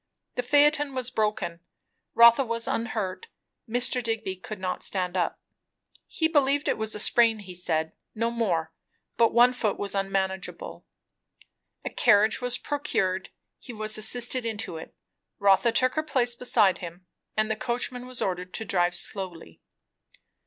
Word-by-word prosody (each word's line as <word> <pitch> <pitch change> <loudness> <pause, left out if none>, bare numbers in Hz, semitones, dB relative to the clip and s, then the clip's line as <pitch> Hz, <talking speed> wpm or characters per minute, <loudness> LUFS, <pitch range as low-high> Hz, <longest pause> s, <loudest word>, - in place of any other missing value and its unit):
The - - -1
phaeton 290 +1 +3
was 255 -1 -2
broken; 210 -6 -1 0.6
Rotha 235 +3 +7
was 230 -1 -2
unhurt; 220 - -3 0.4
Mr. 245 +2 +1
Digby 225 -5 -3
could 205 +3 -8
not 185 -1 -3
stand 180 -2 -2
up. 175 -2 -1 0.7
He 320 - 0
believed 285 -2 +2
it - - +2
was 220 0 -1
a - - -4
sprain, 230 +1 +3
he 195 -3 -10
said; 160 -3 -1 0.2
no 230 +1 0
more; 180 -9 -1 0.4
but 230 -1 +3
one 245 +2 +5
foot 225 -4 -1
was 200 -1 -2
unmanageable. 195 -1 -3 1.0
A - - -3
carriage 215 +3 +3
was 245 0 0
procured, 190 -11 -2 0.3
he 245 - -10
was 215 0 -1
assisted 240 +3 +2
into 220 -6 -4
it, 160 - -11 0.4
Rotha 200 +4 +4
took 255 +2 +2
her 310 - 0
place 260 -6 +1
beside 210 -6 +2
him, 175 +1 -9 0.3
and 215 0 +1
the - - 0
coachman 245 +2 -2
was 255 -1 -3
ordered 180 -1 -3
to 225 - -4
drive 175 -3 +1
slowly. 175 - -5
220 Hz, 150 wpm, -26 LUFS, 190-245 Hz, 1.0 s, Rotha